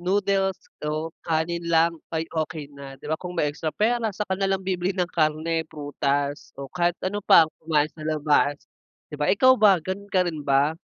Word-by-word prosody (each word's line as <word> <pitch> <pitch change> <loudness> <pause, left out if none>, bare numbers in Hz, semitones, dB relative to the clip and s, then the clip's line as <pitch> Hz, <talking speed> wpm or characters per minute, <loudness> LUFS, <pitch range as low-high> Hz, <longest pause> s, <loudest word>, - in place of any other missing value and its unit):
noodles 195 +1 +1 0.2
o 155 +2 -3
kanin 170 +1 0
lang 165 0 +4 0.2
ay 160 0 0 0.2
okey 155 -1 -6
na 140 -1 -10
di - - -11
ba? 155 - 0
Kung 180 0 -7
may - - +2
extra 155 +2 -4
pera, 230 +5 +1
saka 210 -2 -2
na 195 -1 +1
lang 190 0 -1
bibili 185 -1 -1
ng 180 -1 +1
karne, 160 +1 0
prutas 145 -1 -2
o 140 - -5
kahit 175 0 +1
ano 205 +2 -2
pang 165 -4 +7 0.2
kumain 155 -2 +2
sa 155 - -11
labas 150 -2 +1 0.5
di - - -4
ba? 150 - +1
Ikaw 255 +6 +6
ba, 200 -4 +6
ganon 190 +5 -6
ka 185 -1 +3
rin 160 -3 -3
ba? 140 +2 +2
165 Hz, 195 wpm, -24 LUFS, 150-190 Hz, 0.5 s, pang